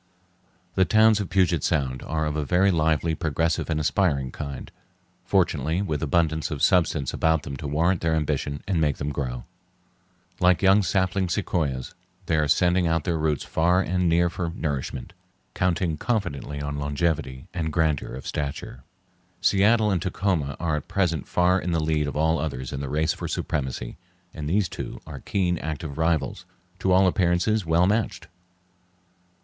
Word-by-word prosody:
The 95 - +3
towns 110 +3 +5
of 100 - -3
Puget 90 -6 +2
Sound 65 -6 0
are 80 0 -2
of 75 -1 -2
a 75 - -1
very 90 +6 +3
lively, 80 -1 +1
progressive, 80 +1 -1
and 80 -1 0
aspiring 75 -5 +1
kind, 70 -2 -7 0.5
fortunately 85 -2 +1
with 80 -6 -2
abundance 80 -1 +1
of 75 -4 -4
substance 80 -7 +2
about 80 -2 +1
them 70 - -6
to 75 - -5
warrant 85 +5 +1
their 80 -1 +1
ambition 75 -2 -2
and 90 -4 +1
make 75 -3 +1
them 75 0 -3
grow. 65 -4 -4 1.0
Like 90 -1 +3
young 95 +2 +6
sapling 95 -1 0
sequoias, 80 -9 -1 0.3
they 80 - +1
are 75 -1 +2
sending 90 +3 +3
out 80 -1 +1
their 85 -1 -1
roots 75 -2 0
far 90 +3 +2
and 90 -1 0
near 85 +1 +3
for 85 0 -3
nourishment, 70 -6 -4 0.4
counting 90 -3 0
confidently 75 - -2
on 70 0 -4
longevity 70 -2 -2
and 80 -3 -2
grandeur 75 -5 0
of 65 - -9
stature. 70 -3 -5 0.6
Seattle 105 +2 +3
and 90 -4 0
Tacoma 90 -6 -1
are 80 -2 0
at 75 - -7
present 85 -7 0
far 90 +1 +2
in 90 - -2
the 85 - +2
lead 75 -1 0
of 70 - -5
all 80 +2 +2
others 65 -5 -4
in 70 - -3
the 70 -1 -4
race 80 +3 +1
for - - -6
supremacy, 65 -4 -3 0.4
and 75 -2 -5
these 100 +2 +2
two - - -7
are 70 -4 -8
keen, 90 0 -1
active 80 -1 -5
rivals, 80 -4 0 0.4
to 95 - +1
all 95 +1 +5
appearances 90 +2 +1
well 85 +2 +4
matched. 105 +3 0
80 Hz, 165 wpm, -25 LUFS, 75-90 Hz, 1.0 s, young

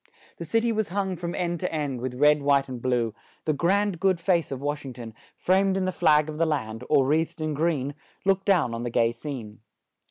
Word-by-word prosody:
The 170 - -6
cit 225 +8 +1
y 235 - +2
was 220 -2 0
hung 190 0 -2
from 170 0 -4
end 175 -2 -2
to 180 - -2
end, 145 -6 -2
with 125 0 -4
red, 150 0 +5
white 140 -1 +3
and 125 -2 -7
blue; 120 -3 0 0.3
the 155 - +2
grand, 190 +4 +1
good 190 -2 +2
face 170 -3 +1
of 135 - -3
Wash 145 +1 -3
ing 135 -2 -7
ton, 115 -2 -9 0.2
framed 190 +1 +2
in 190 - 0
the 185 - 0
flag 150 -3 +3
of 155 0 -6
the 165 - +3
land, 115 -6 -2
or 140 -3 +4
wreathed 160 +4 0
in 155 -1 -2
green, 145 -3 0 0.3
looked 195 0 +2
down 175 - +3
on 115 - -4
the 120 - -2
gay 115 0 +2
scene. 120 -4 -7
150 Hz, 230 wpm, -26 LUFS, 130-180 Hz, 0.3 s, red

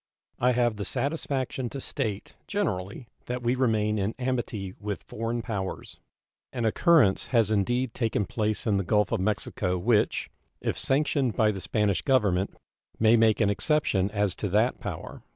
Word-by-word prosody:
I 125 +1 +3
have 120 -3 +1
the 105 - -3
satisfaction 135 - -2
to 140 - -6
state, 110 -7 -4
generally, 110 - -2 0.2
that 125 0 -3
we 120 +1 +2
remain 110 -4 +1
in 100 +3 -1
amity 120 -7 -2
with 105 -3 -4
foreign 115 +1 -3
powers. 100 -5 -5 0.5
An 120 -3 -2
occurrence 130 - +4
has 115 -3 +2
indeed 120 +4 +1
taken 110 -4 0
place 110 +2 -2
in 105 -3 +2
the 100 - 0
Gulf 105 +2 +2
of - - +1
Mexico 95 -2 -1
which, 105 +4 +1 0.3
if - - -2
sanctioned 135 -3 +1
by 110 -1 +3
the 95 -2 -6
Spanish 105 -2 +1
Government, 100 -8 +1 0.4
may 110 +1 +5
make 110 -2 +4
an 100 -1 +3
exception 105 - +1
as 105 -2 0
to 105 - -2
that 110 +6 +2
power. 95 -6 -6
110 Hz, 160 wpm, -27 LUFS, 100-125 Hz, 0.5 s, may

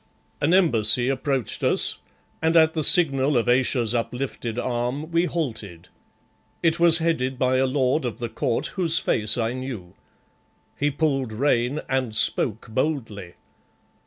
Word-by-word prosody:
An 150 +3 +1
embassy 125 - +3
approached 135 -3 -2
us, - - +1 0.4
and 160 +1 +2
at 160 0 +4
the 155 - -2
signal 140 -4 +5
of 120 - 0
Ayesha's 120 -2 +1
uplifted 120 -1 -4
arm 125 +6 -3
we 170 +1 +1
halted. 110 - -5 0.7
It 165 -1 +1
was 170 -1 +6
headed 160 -6 -1
by 130 0 +1
a 135 +1 +1
lord 130 +2 0
of 120 -3 -4
the 120 - -4
court 120 0 -2
whose 170 -4 +2
face 105 -5 0
I 115 0 -1
knew. 125 -9 -7 0.8
He 145 - 0
pulled 135 -4 -1
rein 125 +3 0
and 130 -4 -2
spoke 110 0 +1
boldly. 110 - -3
130 Hz, 140 wpm, -23 LUFS, 120-155 Hz, 0.8 s, was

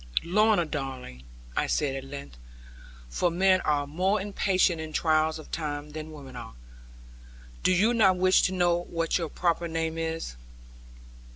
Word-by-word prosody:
'Lorna, 205 +1 +3
darling,' 130 - -6 0.3
I - - +1
said 140 -3 0
at 135 - -5
length, 70 - -9 0.7
for 120 - 0
men 185 +2 +3
are 145 -1 +1
more 185 +8 0
impatient 190 -3 +1
in 155 -1 -7
trials 155 -1 +2
of 155 - -12
time 150 -2 -4
than 155 +1 -7
women 140 -4 -11
are, 115 - -9 1.1
'do - - +3
you 205 +6 +3
not 205 -5 +5
even - - -6
wish 185 0 +5
to - - -5
know 175 -2 +2
what 165 +1 -1
your 165 -2 -3
proper 170 +1 0
name 165 0 -2
is?' 160 - -3
165 Hz, 160 wpm, -27 LUFS, 145-185 Hz, 1.1 s, not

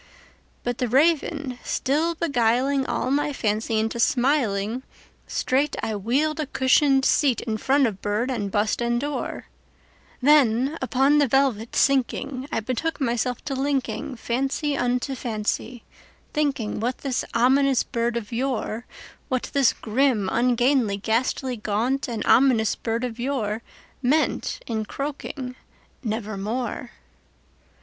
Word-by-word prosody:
'But 245 0 -2
the 250 - +1
Raven 290 -1 +1
still 315 +5 0
beguiling 265 -2 +1
all 255 - -1
my 290 +1 +1
fancy 220 -3 -1
into 225 +2 -1
smiling, 240 -4 +1 0.5
Straight 275 +3 0
I 220 - -1
wheeled 275 +10 0
a 305 - -1
cushioned 270 0 +3
seat 270 -6 +3
in 220 -2 -2
front 275 +5 +3
of 205 -5 -3
bird 215 +5 -1
and 210 -5 -2
bust 210 +3 0
and 240 0 +1
door; 290 +2 -4 0.7
Then, 270 -1 +4
upon 270 +3 +3
the 285 - +4
velvet 250 -4 +1
sinking, 270 0 +1
I - - 0
betook 255 +9 -2
myself 245 -1 -1
to 280 - -2
linkingFancy 275 +1 -1
unto 250 +1 0
fancy, 230 0 -3 0.5
thinking 280 -9 -1
what 245 +4 -1
this 270 -3 -2
ominous 265 +2 +4
bird 235 -1 -1
of 210 -3 -6
yore, 235 -2 -2 0.4
What 255 -2 -2
this 275 -4 +4
grim, 225 -3 +1
ungainly, 245 -3 +2
ghastly, 245 +4 -1
gaunt, 225 +6 -1
and 230 -3 -3
ominous 245 -4 +4
bird 230 +1 -2
of 240 -2 -3
yoreMeant 250 +3 -2
in 220 -2 -2
croaking 275 +1 -5 0.5
"Nevermore." 220 +2 -3
250 Hz, 125 wpm, -24 LUFS, 225-275 Hz, 0.7 s, Then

